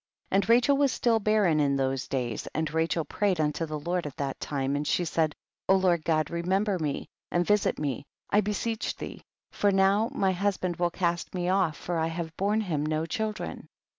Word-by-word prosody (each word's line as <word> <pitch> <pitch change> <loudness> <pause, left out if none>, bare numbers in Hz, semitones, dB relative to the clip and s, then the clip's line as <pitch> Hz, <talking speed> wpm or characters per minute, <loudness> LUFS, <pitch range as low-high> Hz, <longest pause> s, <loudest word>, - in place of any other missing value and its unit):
19. - - +1
And 200 +1 +1
Rachel 245 +4 +5
was 280 -2 +3
still 230 -1 +2
barren 205 -7 +3
in 140 -2 +2
those 135 -2 -1
days, 120 -5 -3
and 160 0 -1
Rachel 160 0 +1
prayed 195 +2 0
unto 155 +2 0
the 155 0 -3
Lord 175 +1 -2
at 140 - -9
that 140 -1 -3
time, 140 -1 -1
and 145 +1 -2
she 175 - +1
said, 160 -2 0 0.3
O 190 - +7
Lord 180 -4 +2
God 155 -1 +1
remember 190 +3 0
me 150 -3 -2 0.2
and 175 0 +1
visit 210 +1 +2
me, 140 -2 -3 0.2
I 205 - +5
beseech 215 +2 -2
thee, - - -8 0.3
for 205 - +2
now 195 +3 +3
my 195 -9 +1
husband 185 -2 -1
will 175 0 +2
cast 175 +1 -2
me 180 0 -1
off, 185 -5 +2
for 175 -2 -2
I 160 - +1
have 165 -1 -5
borne 205 +3 +1
him 160 -8 -1
no 155 +1 0
children. 215 +6 -4
175 Hz, 200 wpm, -28 LUFS, 155-200 Hz, 0.3 s, O